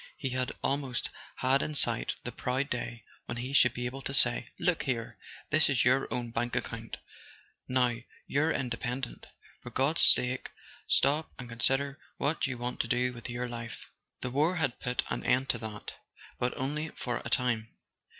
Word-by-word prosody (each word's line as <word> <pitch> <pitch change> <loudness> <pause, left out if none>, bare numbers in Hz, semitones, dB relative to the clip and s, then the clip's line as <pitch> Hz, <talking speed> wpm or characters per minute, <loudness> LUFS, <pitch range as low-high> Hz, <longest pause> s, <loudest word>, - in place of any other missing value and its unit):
He 135 -3 -2
had 130 0 -1
almost 135 -2 0 0.2
had 130 +2 +3
in 150 - -2
sight - - +2
the - - -4
proud 130 +3 -1
day 120 -2 -3 0.2
when 120 - -3
he 125 +3 -4
should 125 -3 +6
be 125 - -2
able 130 +2 -4
to 140 - -2
say: 120 -3 +4
"Look 180 -2 +2
here: 120 -5 -2 0.3
this 155 -1 +5
is 130 -4 +3
your 130 0 +3
own 120 0 -2
bank 120 +1 -1
account. - - -3 0.7
Now 125 -2 +2 0.3
you're 155 +4 +2
inde¬ 120 -5 -1
pendent—for 125 +1 -6
God's 145 +5 +2
sake 125 +1 +5 0.4
stop 145 +4 +3
and 125 - -7
consider 135 +5 +1 0.2
what 150 +1 +1
you 130 -2 -3
want 120 +1 -3
to - - +1
do 125 +1 +1
with 120 0 -8
your 125 +1 -2
life." 120 -1 -7 0.3
The 125 - -2
war 155 +7 +3
had 145 -8 0
put 125 0 0
an - - -2
end 130 +2 +2
to 115 - +1
that—but 110 +3 -6
only 150 +4 -2
for 120 -1 -2
a 120 - -4
time. 120 -4 +1
125 Hz, 175 wpm, -31 LUFS, 120-135 Hz, 0.7 s, should